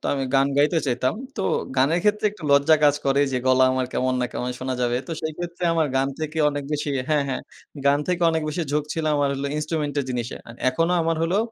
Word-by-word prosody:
তো - - -23
আমি 135 -1 -1
গান 135 0 +4
গাইতে 150 +4 +3
চাইতাম। 130 0 0 0.2
তো 195 - -2 0.3
গানের 145 +7 +3
ক্ষেত্রে 210 0 +2
একটু 205 -4 -15
লজ্জা 140 +3 +5
কাজ 145 -1 +5
করে 135 +1 +3
যে, 130 - +1
গলা 130 0 +5
আমার 130 -1 0
কেমন 130 0 0
না - - +1
কেমন, 125 - -3
শোনা 130 0 -2
যাবে? 120 0 +1
তো 170 - -5
সেইক্ষেত্রে 175 +3 -4
আমার 160 -2 +2
গান 135 +1 +2
থেকে 155 +1 -3
অনেক 145 -1 -4
বেশি 150 0 -2 0.2
হ্যাঁ, 150 -2 +2
হ্যাঁ। 130 - -3 0.4
গান 140 +1 +4
থেকে 180 -1 0
অনেক 160 -1 -1
বেশি 155 +3 -2
ঝোঁক 150 0 +1
ছিল, 160 - -3
আমার 145 -1 +2
হল 135 +1 -4
ইন্সট্রুমেন্ট 150 -1 -2
এর - - -4
জিনিসে। 120 -1 -3
আন 115 - -10
এখনো 165 +7 +1
আমার 165 0 0
হলো, 175 +4 +1
145 Hz, 230 wpm, -23 LUFS, 130-165 Hz, 0.4 s, লজ্জা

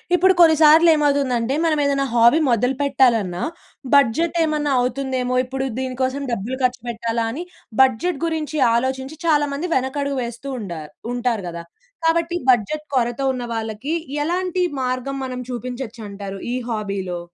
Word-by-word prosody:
ఇప్పుడు 375 +2 +5
కొన్ని 325 -2 +7
సార్లు 320 +2 +7
ఏమవుతుందంటే 275 -4 +1
మనం 310 -2 +2
ఏదన్నా 275 -1 +1
హాబీ 235 +6 +5
మొదలు 250 +3 +2
పెట్టాలన్నా 235 -10 +2 0.5
బడ్జెట్ 285 +6 +3
ఏమన్నా 300 -2 0
అవుతుందేమో! 255 0 -1
ఇప్పుడు 265 +1 -3
దీని 260 -1 -3
కోసం 260 +2 -1
డబ్బులు 235 +3 -3
ఖర్చు 250 -1 +1
పెట్టాలా? 230 0 -2
అని 305 +9 -5 0.4
బడ్జెట్ 265 +5 +2
గురించి 315 -2 -2 0.2
ఆలోచించి 265 +4 -2
చాలామంది 295 +1 +1
వెనకడుగు 275 +2 -1
వేస్తూ 235 +3 -7
ఉండారు 170 -8 -7 0.2
ఉంటారు 240 -4 -1
కదా! 170 0 -6 0.4
కాబట్టి 335 +1 +1
బడ్జెట్ 255 +6 +2
కొరత 240 +1 0
ఉన్న 250 -1 -4
వాళ్ళకి 225 +6 -3 0.3
ఎలాంటి 360 +2 0 0.2
మార్గం 255 +2 -2
మనం 255 -1 -5
చూపించొచ్చంటారు 220 -5 -6
ఈ - - -1
హాబీలో? 200 -5 -3
260 Hz, 135 wpm, -21 LUFS, 235-295 Hz, 0.5 s, కొన్ని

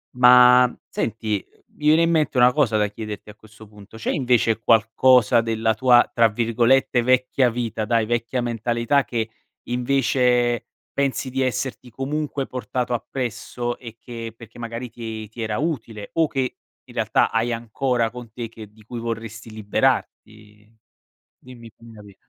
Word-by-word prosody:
Ma 125 0 +7 0.2
senti, 110 -3 -2 0.3
mi 150 - -4
viene 160 +2 +5
in 165 - +2
mente 155 -5 +1
una 125 0 +6
cosa 125 -7 +2
da 105 -1 +2
chiederti 105 0 -8
a - - -18
questo 110 0 -16
punto. 105 +1 -14
C'è 110 - -2
invece 120 -4 +2
qualcosa 115 +1 +4
della 115 -1 0
tua, 120 +2 +5
tra 115 -1 +5
virgolette, 120 +3 +2
“vecchia 130 +1 +2
vita”, 115 -2 -3
dai, 115 0 +1
vecchia 120 +2 -1
mentalità, 120 +3 0
che 115 -2 -3 0.4
invece 125 -1 +1 0.3
pensi 135 -2 -1
di 135 +1 -1
esserti 130 0 -3
comunque 140 +3 -3
portato 125 -1 -3
appresso 120 0 -4
e 115 -2 -10
che 115 -2 -7
perché 115 0 -13
magari 115 +1 -6
ti 110 -2 -7
ti 115 +2 -9
era 110 -1 -2
utile, 115 -10 -4
o 165 -1 +2
che 135 -3 -3 0.3
in - - -15
realtà - - +1
hai 115 +1 0
ancora 120 +1 -1
con 120 -1 -10
te 120 +1 -7
e 115 - -5
che 110 -2 -12
di 110 0 -20
cui 120 +2 -7
vorresti 115 -1 -6
liberarti? 110 0 -3 0.7
Dimmi 120 -2 -12
fammi 115 0 -15
capir 105 -2 -14
120 Hz, 155 wpm, -22 LUFS, 110-125 Hz, 0.7 s, Ma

